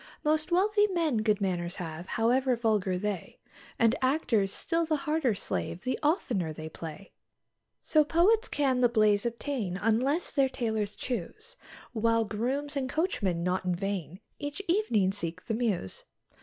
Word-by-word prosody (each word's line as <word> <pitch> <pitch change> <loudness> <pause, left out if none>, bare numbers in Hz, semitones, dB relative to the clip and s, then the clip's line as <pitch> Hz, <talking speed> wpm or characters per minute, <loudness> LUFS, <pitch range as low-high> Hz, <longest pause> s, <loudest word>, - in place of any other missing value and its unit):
Most 310 +2 +1
wealthy 415 +4 +4
men 335 - 0
good 215 -1 +2
manors 175 -2 -1
have, 170 -1 -6
however 250 +3 +2
vulgar 210 -5 +1
they; 205 -1 -4 0.4
And 230 0 +4
actors 250 -7 +2
still 335 - 0
the 315 -1 +1
harder 300 -6 0
slave 180 -2 -3
the 255 - -2
oftener 245 - 0
they 155 +1 -7
play. 165 +4 -9 0.7
So 310 -1 +4
poets 385 +10 +3
can't 265 -3 +1
the 245 - +5
baize 215 -2 +3
obtain, 235 -6 -3
unless 245 - +1
their 275 -2 +2
tailors 220 -5 -2
choose; 345 - -5 0.4
While 230 0 +2
grooms 265 +8 -2
and 265 -2 -1
coachmen 200 - 0
not 180 +1 0
in 180 -1 0
vain 190 -2 -4 0.2
each 290 +2 -4
evening 335 - +2
seek 175 -2 -5
the - - -2
Mews. 215 - -2
230 Hz, 150 wpm, -29 LUFS, 195-295 Hz, 0.7 s, the